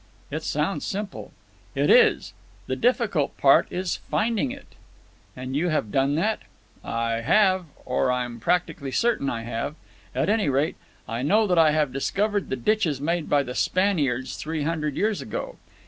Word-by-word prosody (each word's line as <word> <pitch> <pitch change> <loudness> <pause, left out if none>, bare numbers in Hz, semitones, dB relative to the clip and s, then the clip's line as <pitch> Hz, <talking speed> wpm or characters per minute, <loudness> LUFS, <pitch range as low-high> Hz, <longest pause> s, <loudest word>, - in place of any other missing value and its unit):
"It - - -3
sounds - - -1
simple." 205 -2 -5 0.4
"It - - +3
is. 460 -3 +4 0.3
The - - -2
difficult 230 - +1
part 135 -1 +5
is 185 0 -2
finding 230 +3 +1
it." 280 +2 -10 0.6
"And 130 +1 -5
you 170 +5 +1
have 150 -10 -1
done 135 +3 +2
that?" 210 +7 +1 0.4
"I 115 0 -1
have. 185 - +3 0.2
Or 125 0 +1
I'm 125 -2 -2
practically 170 0 0
certain 225 - +1
I 115 -1 -3
have. 120 +6 -4 0.4
At - - +1
any 210 -6 +2
rate, 140 +4 0 0.3
I 115 +2 -3
know 210 +11 +3
that 180 -4 +2
I 160 -1 +6
have 150 -3 +1
discovered 205 +9 -1
the - - 0
ditches 155 - +1
made 165 +2 -1
by 145 -1 +3
the 125 -2 -6
Spaniards 145 -9 0
three 155 -1 -3
hundred 150 -2 -1
years 215 -1 0
ago. - - -5
155 Hz, 165 wpm, -25 LUFS, 135-205 Hz, 0.6 s, I